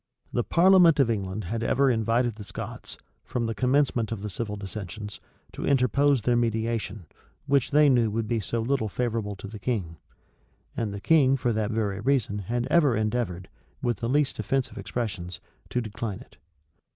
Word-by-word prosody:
The 120 - +1
parliament 175 -1 +5
of 125 -4 +4
England 100 -1 -3
had 110 +6 -3
ever 135 +3 +3
invited 115 +1 +1
the 105 0 -9
Scots, - - -8 0.3
from 120 -2 -2
the 115 - -1
commencement 125 -1 +1
of 105 -3 -4
the 105 - -4
civil 105 +1 -4
dissensions, 100 +1 -7 0.3
to - - -7
interpose 140 -1 +3
their 120 +1 +2
mediation, 115 -3 -1 0.4
which 140 -3 +2
they 150 0 +5
knew 120 -5 +4
would 110 +1 -2
be 115 0 0
so 115 +3 -2
little 120 -2 0
favorable 115 -2 -2
to 100 - -9
the 105 +1 -9
king: 95 -8 -2 0.8
and 110 -3 -2
the 100 - -5
king 135 -3 +4
for 120 -2 0
that 110 -1 -1
very 105 -3 -1
reason 115 -4 +1
had 120 +5 -2
ever 150 -8 +4
endeavored, 110 -4 -1 0.4
with 120 -3 0
the 115 +3 -3
least 145 +1 +1
offensive 135 -1 -1
expressions, 95 -7 -4 0.3
to 125 - 0
decline 105 -2 -5
it. - - -17
115 Hz, 175 wpm, -26 LUFS, 105-125 Hz, 0.8 s, parliament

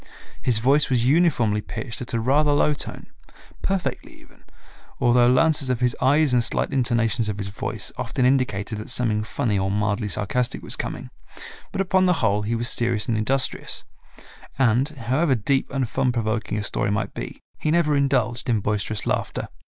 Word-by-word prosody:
His 120 -3 +1
voice 135 +6 +3
was 120 -3 +1
uniformly 125 -8 +3
pitched 115 +2 -6
at 125 - -5
a - - +1
rather 145 +5 +3
low 145 +1 +3
tone, 145 - -5 0.6
perfectly 195 -2 -2
even, - - -22 0.6
although 120 0 +4
lances 140 +1 +3
of 125 -2 0
his 125 -1 +1
eyes 145 0 +3
and 120 -1 +3
slight - - -1
intonations 120 -3 +1
of 105 - -3
his 100 -1 -4
voice 100 +1 -5
often 125 +1 -1
indicated 120 -5 0
that 110 - -8
something 110 -3 0
funny 105 -1 -1
or 95 0 0
mildly 105 +1 -1
sarcastic 110 +6 -2
was - - -2
coming, - - -5 0.6
but - - -1
upon 190 0 +2
the 180 - +4
whole 105 -1 +2
he 110 +3 -1
was 120 +1 0
serious 115 -3 +2
and 115 - 0
industrious, 130 +5 -1 0.7
and, 130 +2 +3
however 135 +2 0
deep 135 +4 0
and 135 -2 -1
fun 130 +1 0
provoking 110 -2 -2
a 105 - -2
story 100 - -1
might 105 +2 -2
be, - - -7 0.2
he 155 - -1
never 155 -2 +2
indulged 130 -3 0
in 115 -3 +2
boisterous 105 0 -2
laughter. - - -2
120 Hz, 175 wpm, -23 LUFS, 110-135 Hz, 0.7 s, although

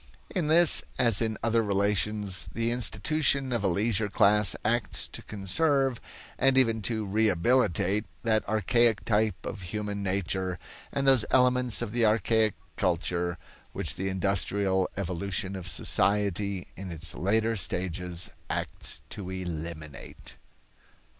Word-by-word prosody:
In 180 -6 -1
this 165 +1 +8 0.2
as 115 -5 +2
in 110 -2 -1
other 115 0 +2
relations, 100 -1 0
the 115 0 0
institution 130 +3 +2
of 115 -4 -1
a - - +2
leisure 105 +3 0
class 105 0 +3
acts 115 0 0
to - - -8
conserve, 135 - 0 0.4
and 135 -1 +3
even 115 -4 +3
to 110 -2 -2
rehabilitate, 105 0 +1 0.2
that 110 -2 +1
archaic 110 +1 +2
type 105 -3 0
of 100 - -6
human 100 +2 -4
nature 95 -2 -2 0.3
and 140 - -2
those 135 -4 +5
elements 125 -2 +3
of 110 - -5
the 120 +1 0
archaic 110 -1 +2 0.2
culture 85 -1 -1 0.4
which - - -2
the 95 +1 -3
industrial 95 0 0
evolution 95 +1 -3
of 95 -2 -7
society 100 0 0
in 95 0 -7
its 85 +1 -4
later 110 +4 0
stages 90 -2 -2 0.2
acts - - -4
to 95 -3 -6
eliminate. 85 -5 -7
105 Hz, 125 wpm, -27 LUFS, 95-115 Hz, 0.4 s, this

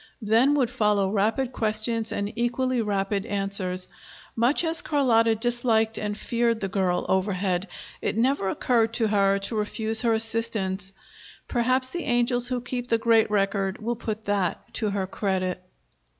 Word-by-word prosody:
Then 230 +7 +3
would 255 -4 +1
follow 210 -5 +1
rapid 225 +6 0
questions 220 0 -1
and 200 +1 -3
equally 240 +1 0
rapid 200 -1 -1
answers. 195 -3 0 0.5
Much 240 +8 +2
as 325 0 +3
Carlotta 230 -6 +2
disliked 225 -1 0
and 210 -1 -3
feared 235 -1 0
the 195 - -2
girl 185 -2 -1
overhead, 190 -1 0 0.3
it - - -2
never 235 -4 +1
occurred 230 +1 +1
to 225 -3 +1
her 200 -1 +2
to 200 +3 -3
refuse 220 +1 +2
her 235 -2 +2
assistance. 220 -4 0 0.6
Perhaps 255 +1 0
the 350 - -4
angels 240 0 +3
who 250 -1 -2
keep 245 0 -5
the 230 - +2
great 225 -1 +3
record 195 -1 0
will 235 +2 -2
put 220 -1 -5
that 200 -4 -2
to 215 -3 -1
her 200 -1 -2
credit. 185 -2 -2
220 Hz, 150 wpm, -25 LUFS, 200-240 Hz, 0.6 s, Then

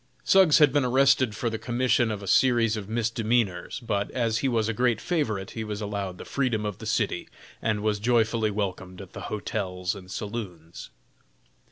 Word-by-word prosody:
Suggs 190 -6 +6
had 150 -4 +5
been 145 - +3
arrested 130 -2 +3
for 120 - -2
the 110 -1 -2
commission 120 -1 +1
of 105 -2 -4
a - - -7
series 115 +1 +3
of 105 -2 -6
misdemeanors, 115 -3 0
but, 105 -4 -1
as 115 -3 0
he 135 - 0
was 115 -4 +1
a 115 - -1
great 120 0 +1
favorite, 110 - -2
he 110 - -5
was 105 -1 -5
allowed 100 -3 -4
the - - -9
freedom 120 -6 -1
of 105 -3 -4
the - - -7
city, - - -1 0.3
and 110 -2 -1
was 105 -1 0
joyfully 115 -1 +2
welcomed 95 -3 -4
at 95 -2 -11
the - - -7
hotels 95 -4 -3
and 95 -3 -11
saloons. 95 -7 -6
110 Hz, 185 wpm, -26 LUFS, 100-120 Hz, 0.3 s, Suggs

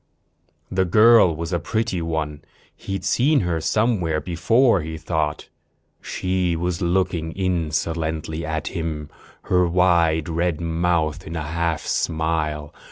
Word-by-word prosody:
The 95 0 +2
girl 105 -1 +6
was 85 +3 -4
a 85 - +1
pretty 110 +1 -1
one. 80 -3 -3 0.3
He'd 95 -1 -5
seen 140 +8 +3
her 85 -3 -1
somewhere 95 -7 +1
before, 95 - +2
he 80 +1 -6
thought. 80 -2 -2 0.5
She 90 -2 -1
was 85 0 -2
looking 85 -2 0
insolently 80 -3 -2
at 80 -2 -3
him, 80 -4 -4 0.3
her 90 -1 +2
wide 85 -3 +3
red 85 -1 -1
mouth 85 -2 -1
in 80 - -6
a 80 - -2
half 80 0 -1
smile. 80 -2 -1
85 Hz, 125 wpm, -22 LUFS, 80-90 Hz, 0.5 s, girl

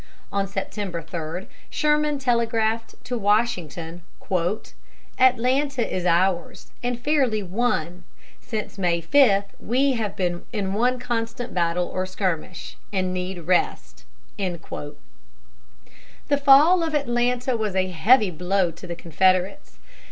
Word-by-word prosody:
On 200 0 0
September 195 -2 -4
3, 165 +2 -5 0.2
Sherman 300 -1 +1
telegraphed 230 -3 0
to 250 -1 -3
Washington: 180 -6 0 1.2
"Atlanta 255 +1 +2
is 180 -1 -1
ours, 175 +1 0
and 245 -1 -2
fairly 250 -6 +1
won.... 180 -4 -1 0.4
Since 215 -4 -5
May 175 -2 +1
5 200 - +4 0.2
we 265 +5 +1
have 220 -5 -2
been 175 -2 -1
in 200 -4 -2
one 245 +4 +2
constant 240 0 -3
battle 175 0 +1
or 185 0 -3
skirmish, 185 -2 -3
and 185 -2 -1
need 180 0 -4
rest." 180 0 0 0.3
The 170 -5 -5 1.5
fall 295 +6 +7
of 320 -2 -1
Atlanta 245 -2 0
was 215 -4 -2
a 185 0 +1
heavy 210 +4 +4
blow 180 +2 0
to 170 +3 -12
the 170 - -4
Confederates. 185 - 0
205 Hz, 115 wpm, -24 LUFS, 180-245 Hz, 1.5 s, fall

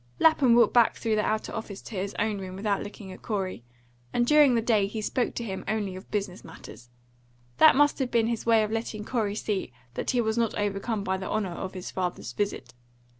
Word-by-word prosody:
Lapham 285 -7 +5
walked 235 -3 +5
back 240 -2 +5
through 225 - -1
the 210 - +1
outer 215 0 -1
office 205 -3 -6
to 220 - -9
his 195 +1 -3
own 210 -1 0
room 185 -1 -7
without 200 +1 -1
looking 205 -2 -8
at - - -11
Corey, 190 - -3 0.5
and 240 - +2
during 295 -2 +6
the - - +3
day 215 -4 +3
he 220 +2 -5
spoke 240 +3 -1
to 235 - -3
him 195 -4 -5
only 205 -4 -1
of 185 - -11
business 195 -3 -3
matters. 125 -6 -12 0.7
That - - +8
must 290 +2 +3
have 260 -2 0
been 230 -2 +2
his 230 -1 -2
way 225 -1 +4
of 215 - -3
letting 220 -2 -3
Corey 220 -5 -1
see 205 - -2 0.2
that - - -3
he 250 - +2
was 220 0 +1
not 230 -2 0
overcome 205 +1 -1
by 190 -1 -1
the 190 - -5
honour 210 -4 -1
of 190 +2 -6
his 185 - -6
father's 180 -10 -3
visit. 140 -9 -3
210 Hz, 225 wpm, -27 LUFS, 195-230 Hz, 0.7 s, That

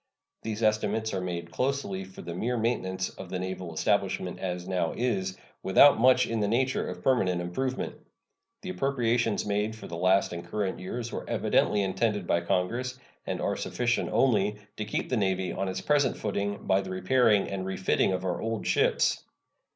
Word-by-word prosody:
These 110 0 -4
estimates 110 0 +1
are 95 - -1
made 85 -2 -4
closely 125 -6 -1
for 95 - -11
the 85 - -5
mere 120 +8 -1
maintenance 95 -5 -1
of 95 - -10
the 90 - -2
naval 95 -1 -4
establishment 80 - 0
as 90 -1 -4
now 90 -3 0
is, 95 -6 -1 0.2
without 110 +8 +6
much 125 +1 +5
in 115 -1 -2
the 105 - +1
nature 130 +5 +1
of - - -7
permanent 95 -9 +2
improvement. 125 +10 -2 0.7
The 185 - -4
appropriations 120 - +1
made 105 +2 -1
for 110 - -10
the 85 - -6
last 95 +1 +3
and 85 0 -5
current 95 +2 -2
years 115 +5 -5
were - - -6
evidently 105 -1 +2
intended 105 0 0
by 85 0 +1
Congress, 120 +9 -1 0.3
and - - -2
are - - 0
sufficient 120 -1 -1
only, 105 -5 +3 0.2
to 105 - -3
keep 105 - -2
the 125 - +1
Navy 95 -3 0
on 95 +1 -2
its 95 - -3
present 145 -4 +2
footing 100 -1 -2
by 95 0 +3
the 95 - -7
repairing 105 +3 +3
and 95 -1 -3
refitting 95 0 +1
of 95 0 -2
our 90 -2 -1
old 115 -1 -3
ships. - - +2
100 Hz, 180 wpm, -28 LUFS, 95-120 Hz, 0.7 s, without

